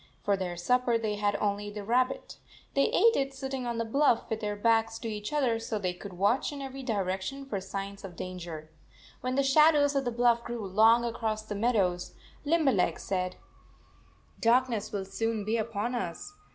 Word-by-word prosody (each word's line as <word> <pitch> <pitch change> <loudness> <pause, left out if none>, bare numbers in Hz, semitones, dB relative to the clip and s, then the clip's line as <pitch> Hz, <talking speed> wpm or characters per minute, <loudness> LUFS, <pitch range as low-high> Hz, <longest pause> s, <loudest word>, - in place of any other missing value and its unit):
For 200 - +2
their 180 -2 -4
supper 245 +5 +2
they 215 -2 -2
had 205 0 +1
only 205 0 -1
the 205 0 -6
rabbit. 250 +4 0 0.4
They 275 - +3
ate 460 0 +4
it 270 0 -1
sitting 265 -2 -4
on 235 -1 -2
the 230 - -1
bluff, 255 0 +2
with 220 - -1
their 210 -1 -2
backs 225 +1 +2
to 230 - -6
each 210 -1 -4
other 260 -6 +1
so 225 -1 -3
they 185 -3 -1
could 190 +2 -9
watch 200 +11 +1
in 290 - -7
every 270 0 -6
direction 205 +3 -2
for 205 -8 -3
signs 195 +1 -6
of 185 -3 -8
danger. 170 -4 -7 0.5
When 255 0 -2
the 275 - +3
shadow 300 +2 +5
of 285 -1 +1
the 245 - -1
bluff 235 0 +3
grew 235 -3 -5
long 220 +5 +5
across 225 -2 -2
the 215 - -6
meadows, 200 -5 0 0.3
Lim 320 +1 +2
berleg 185 - +2
said: 185 -1 -2 0.5
" - - -31
Darkness 235 -2 +2
will 200 -2 -3
soon 225 +1 -2
be 220 +2 +1
upon 225 +1 -2
us. 190 - -4
225 Hz, 190 wpm, -29 LUFS, 200-255 Hz, 0.5 s, shadow